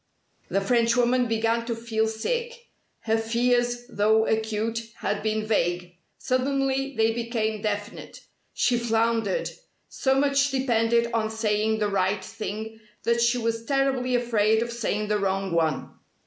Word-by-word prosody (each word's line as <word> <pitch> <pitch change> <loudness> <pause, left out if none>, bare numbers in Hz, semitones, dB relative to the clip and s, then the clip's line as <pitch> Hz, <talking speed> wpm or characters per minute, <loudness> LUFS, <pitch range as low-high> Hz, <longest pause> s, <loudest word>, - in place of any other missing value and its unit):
The 195 - +1
Frenchwoman 240 +3 +2
began 230 +1 +1
to 235 - -1
feel 225 -1 -1
sick. 475 - -3 0.3
Her 225 0 +1
fears, 240 +1 +1
though 220 0 +2
acute, 220 +1 -1
had 205 - -2
been 215 0 -1
vague. 175 -4 -1 0.2
Suddenly 270 +1 0
they 225 0 +3
became 225 -2 -2
definite. 205 +1 -4 0.3
She 240 -1 +1
floundered. 230 - 0 0.4
So 265 0 +1
much 280 0 +2
depended 235 -3 +1
on 220 -1 0
saying 220 0 0
the 210 -1 0
right 190 0 0
thing 220 0 -6 0.2
that 235 0 +2
she 235 +1 +3
was 230 -1 -2
terribly 265 -1 +1
afraid 220 -2 +2
of 235 - -6
saying 215 -3 -2
the 210 0 +1
wrong 195 -1 -1
one. 160 -4 0
225 Hz, 135 wpm, -25 LUFS, 215-245 Hz, 0.4 s, they